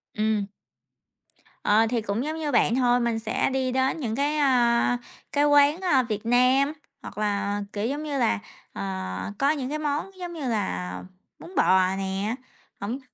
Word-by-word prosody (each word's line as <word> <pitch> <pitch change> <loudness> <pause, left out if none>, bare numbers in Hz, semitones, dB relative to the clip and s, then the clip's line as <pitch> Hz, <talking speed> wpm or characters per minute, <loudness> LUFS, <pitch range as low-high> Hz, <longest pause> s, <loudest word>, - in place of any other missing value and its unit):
Ừm. 215 -1 0 1.2
Ờ, 220 +2 +4
thì 240 -1 0
cũng 210 +3 -2
giống 310 +2 -3
như 305 -2 -2
bạn 235 -2 +3
thôi, 245 -1 +3
mình 235 -2 0
sẽ 220 0 0
đi 260 -1 -1
đến 260 +4 +1
những 230 -6 -2
cái, 285 +3 0
à, 245 -4 +3 0.3
cái 290 0 +2
quán, 290 +3 +5
ờ, 290 -9 +3
Việt 215 0 -3
Nam, 255 +4 +3 0.3
hoặc - - -10
là, 205 -1 -1
kiểu 205 +1 -2
giống 290 +4 -3
như 295 -2 -3
là, 170 - +2 0.3
ờ, - - -6 0.6
có 280 +1 +4
những 275 -4 -3
cái 305 +1 -3
món 300 +5 -2
giống 350 -1 -5
như 305 -6 -4
là 90 - -2 0.4
bún 360 - -12
bò 185 0 +4
nè, 195 +3 -2 0.4
hổng 225 +7 -3
245 Hz, 175 wpm, -25 LUFS, 215-285 Hz, 1.2 s, quán